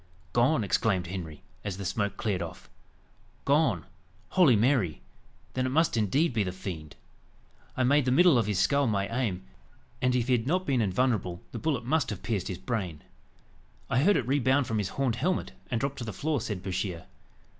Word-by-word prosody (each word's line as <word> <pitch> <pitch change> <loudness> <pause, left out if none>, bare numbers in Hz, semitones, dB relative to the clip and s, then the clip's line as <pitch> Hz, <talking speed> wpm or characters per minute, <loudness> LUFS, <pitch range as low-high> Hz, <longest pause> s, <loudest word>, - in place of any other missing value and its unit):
"Gone!" 120 +1 +3
exclaimed 95 -2 +1
Henry, 85 -4 -6 0.2
as 100 -3 -4
the 100 - -5
smoke 100 +3 -1
cleared 100 -5 -1
off; 85 0 -8 0.7
"gone! 140 - +2 0.4
Holy 170 -10 +5
Mary! 110 - +1 0.5
then 130 0 0
it - - -1
must 160 +3 +2
indeed 125 - +2
be 110 - +1
the 90 - -3
fiend. 85 -5 -7 0.8
I 130 - +2
made 140 +2 +4
the 125 - +2
middle 175 +3 +6
of 110 - 0
his 105 -3 0
skull 140 +6 +3
my 100 -3 0
aim, 110 - -1 0.6
and 125 0 +2
if 120 -2 +1
he - - 0
had 120 0 +1
not 185 +4 +1
been 130 -4 +1
invulnerable, 100 -4 0
the - - -5
bullet 140 -7 -1
must 150 +1 +1
have 105 - -6
pierced 105 -6 -1
his 95 - -4
brain. 95 - -4 0.9
"I 125 - +3
heard 200 +7 +4
it 125 - -1
rebound 135 0 +2
from 110 -2 -1
his 100 - -1
horned 130 -4 -1
helmet, 180 +7 0 0.2
and 120 - 0
drop 140 +2 -2
to 120 - -4
the 110 - -4
floor," 150 -3 -1
said 100 -5 -4
Bouchier. 90 -2 -3
115 Hz, 190 wpm, -28 LUFS, 95-135 Hz, 0.9 s, middle